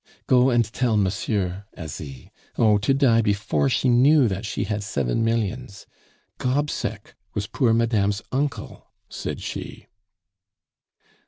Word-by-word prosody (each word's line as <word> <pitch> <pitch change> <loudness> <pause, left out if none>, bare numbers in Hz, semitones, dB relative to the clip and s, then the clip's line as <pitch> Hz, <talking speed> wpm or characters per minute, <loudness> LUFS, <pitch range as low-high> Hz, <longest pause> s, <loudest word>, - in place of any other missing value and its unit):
"Go 125 0 +4
and 120 -2 +3
tell 115 0 0
monsieur, 100 -1 -1
Asie! 75 -6 -8 0.3
Oh, 105 -3 +4
to 105 - +1
die 135 -4 +4
before 105 +5 0
she 125 +1 +1
knew 130 +3 +5
that 100 +2 -3
she 105 - -2
had 105 +1 -2
seven 70 - -1
millions! 115 -1 -2 0.5
Gobseck 125 -6 -2 0.2
was 105 -1 -1
poor 120 +2 +1
madame's 110 -3 +1
uncle!" 140 +2 -3 0.2
said - - -5
she. - - -7
115 Hz, 120 wpm, -23 LUFS, 100-125 Hz, 0.5 s, knew